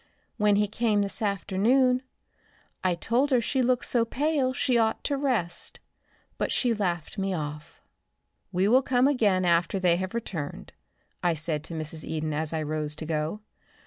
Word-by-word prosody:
When 210 -2 +4
he 210 +1 +2
came 215 -1 +1
this 200 +3 -4
afternoon 220 +6 +2 0.8
I 185 -2 +2
told 240 +10 +1
her 255 -3 +4
she 260 +3 0
looked 250 0 +1
so 240 -2 +2
pale 275 +2 0
she 255 -1 0
ought 225 -1 +2
to 285 - 0
rest, 235 -12 -1 0.6
but - - 0
she 245 -2 +2
laughed 180 -3 -2
me 195 -1 0
off." 150 -1 -6 0.7
"We 185 +1 +2
will 250 +5 +5
come 255 0 +3
again 205 -10 +2
after 170 +2 +2
they 175 -2 +3
have 185 +4 -4
returned," 160 - -5 0.5
I 175 -2 +2
said 155 -1 -3
to 165 - -7
Mrs. 155 0 -5
Eden 155 -1 -3
as 155 +1 -1
I 160 -1 -1
rose 150 0 -2
to 155 - -6
go. 155 +6 -2
195 Hz, 170 wpm, -27 LUFS, 165-240 Hz, 0.8 s, will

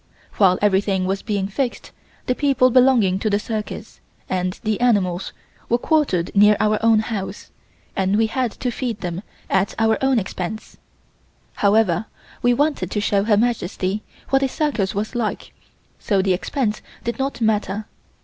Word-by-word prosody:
While 185 -3 +5
everything 195 -2 +2
was 195 +1 -1
being 200 -2 -1
fixed, 240 +5 -3 0.3
the 250 - +1
people 260 -2 +3
belonging 240 -7 +4
to 215 - 0
the 205 - +2
circus, 215 0 -5 0.3
and 185 0 -2
the 215 -2 0
animals, 195 -7 +1 0.4
were 240 - +3
quartered 245 - 0
near 210 +1 +6
our 215 0 +1
own 225 -1 +5
house 215 -4 -5 0.4
and 195 +1 +1
we 225 - +3
had 245 +2 -1
to 250 - -3
feed 230 -4 -4
them 175 0 -4 0.3
at 190 +1 +1
our 225 +2 +1
own 265 -1 +3
expense. 195 0 -4 0.8
However, 205 -2 +2 0.3
we 245 - +3
wanted 280 - +1
to 210 - -2
show 205 -1 +1
Her 210 -2 +3
Majesty 210 -3 -1 0.3
what 270 0 +4
a 270 - +2
circus 255 -10 -1
was 210 +4 -2
like 235 -3 -3 0.5
so 200 -3 +1
the 190 0 +2
expense 215 +4 -2 0.2
did 235 +2 -3
not 270 -1 -2
matter. 215 -2 0
215 Hz, 160 wpm, -21 LUFS, 195-240 Hz, 0.8 s, near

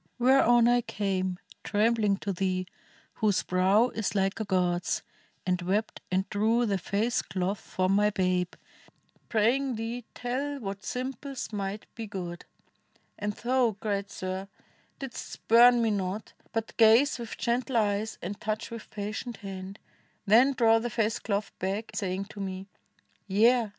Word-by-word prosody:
Whereon 240 -2 +5
I 245 0 +4
came 190 -4 -2 0.3
Trembling 210 -1 +2
to 200 - -2
thee, 185 0 -1 0.5
whose 210 -4 +1
brow 190 +6 +3
is 220 -3 -3
like 195 +1 +1
a 220 - -2
god's, 180 -2 0 0.4
And 180 0 0
wept 200 +5 -1
and 190 +1 +1
drew 225 +4 +2
the 200 -3 0
face 210 +7 0
cloth 185 +2 -2
from 185 0 -1
my 210 +1 +4
babe, 185 -3 0 0.7
Praying 245 +4 +2
thee 230 +2 -4
tell 275 +4 -2
what 195 -3 -5
simples 265 0 -4
might 200 0 -3
be 225 -1 -6
good. 180 -3 -6 0.7
And 210 0 -2
thou, 240 -2 +1
great 200 -2 -2
sir! 185 +1 -4 0.5
didst 270 -4 -6
spurn 240 +1 +6
me 225 - +2
not, 195 +1 -3 0.2
but 225 -1 -3
gaze 230 +5 +6
39 - - -16
INDIA - - -5
With 230 - -8
gentle 245 +1 0
eyes 210 0 0
and 200 +4 -5
touch 215 +1 -3
^dth 230 -1 -8
patient 215 +3 -5
hand; 190 0 -6 0.5
Then 240 +7 +6
draw 225 -3 +4
the 240 +1 -3
face 225 -2 0
cloth 205 -1 -2
back, 195 +4 -2
sa}dng 195 0 -2
to 205 - -10
me, 190 -1 -4 0.6
'Yea! 225 +3 +4
210 Hz, 150 wpm, -28 LUFS, 195-235 Hz, 0.7 s, spurn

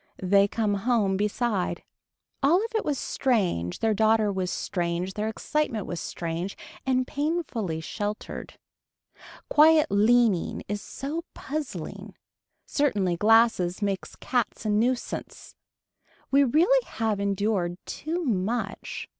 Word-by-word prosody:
They 200 +2 +5
come 210 0 0
home 200 -1 +1
beside. 210 0 -1 0.6
All 290 +4 +5
of 455 +4 -2
it 445 - 0
was 290 -2 -1
strange, 185 - 0
their 225 -1 +3
daughter 220 0 +3
was 190 -2 -2
strange, 175 +1 -2
their 210 +2 -2
excitement 225 -1 -1
was 175 - -4
strange 170 +3 -4 0.3
and 255 -1 +2
painfully 280 - -2
sheltered. 205 +5 -5 0.9
Quiet 310 +1 +6
leaning 215 -2 +3
is 205 0 -3
so 300 +5 -5
puzzling. 295 0 -5 0.5
Certainly 200 - +1
glasses 215 -3 +3
makes 195 -2 -2
cats 245 -3 -2
a 215 - +1
nuisance. 240 +4 -2 0.8
We 280 +1 +5
really 350 - +4
have 220 -3 -1
endured 200 -3 0
too 335 +3 -3
much. 215 -1 -2
215 Hz, 115 wpm, -26 LUFS, 195-260 Hz, 0.9 s, Quiet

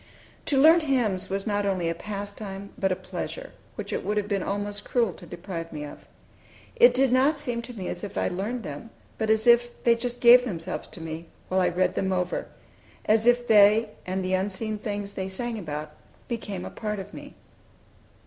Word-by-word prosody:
To 280 - +2
learn 320 +5 +8
hymns 245 - 0
was 195 +1 -2
not 205 -2 0
only 190 -4 0
a 165 - +1
pastime, 200 +1 -6
but 190 -1 0
a - - +2
pleasure - - -6 0.2
which - - -5
it - - -2
would 210 +1 -1
have 205 -1 0
been 200 -2 0
almost 205 +1 -3
cruel 230 -7 +1
to 175 - -13
deprive 170 0 -6
me 150 -2 -5
of. 145 - -10 0.8
It 485 +1 +6
did 265 -1 +3
not 270 +5 +4
seem 245 -5 -3
to 240 +1 -9
me 190 -4 -5
as - - -5
if 205 -1 -6
I - - +1
learned 210 +7 -3
them, 150 +6 -7 0.3
but 220 -1 0
as 220 0 +3
if 240 0 +4
they 235 - +6
just 245 +1 -3
gave 245 +1 +8
themselves 185 -6 -4
to 170 - -11
me 165 +1 -6 0.2
while 185 0 +2
I 180 - +3
read 185 +2 +1
them 190 0 -1
over; 180 -1 -1 0.6
as 220 +2 +3
if 245 0 +4
they, 210 +1 +6 0.2
and 185 0 -2
the 185 - -1
unseen 205 +3 -1
things 205 -2 -4
they 190 0 -4
sang 230 +3 -3
about, 150 -4 -5 0.4
became 205 -6 -4
a - - -7
part 210 -2 -3
of 195 +1 -8
me. - - -10
205 Hz, 205 wpm, -26 LUFS, 185-235 Hz, 0.8 s, learn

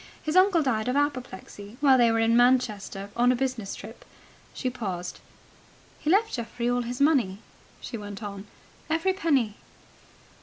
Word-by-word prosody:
His 310 +2 -2
uncle 370 -3 +5
died 225 -5 0
of 250 - 0
apoplexy, 250 -6 -3
while 280 -2 +5
they 240 -2 +4
were 225 - +1
in 225 +1 +3
Manchester 215 -5 +1
on 245 +1 +4
a - - +2
business 245 -6 -3
trip." 220 +4 -11 0.5
She 255 - -4
paused. 185 -7 -5 0.8
"He 300 - -2
left 420 +5 +3
Geoffrey 235 0 -3
all 245 0 +1
his 245 +1 -5
money," 275 -10 +3 0.4
she 230 - -6
went 205 +1 -8
on. 200 0 -7 0.4
"Every 330 +4 +1
penny." 275 - +1
245 Hz, 155 wpm, -26 LUFS, 210-280 Hz, 0.8 s, uncle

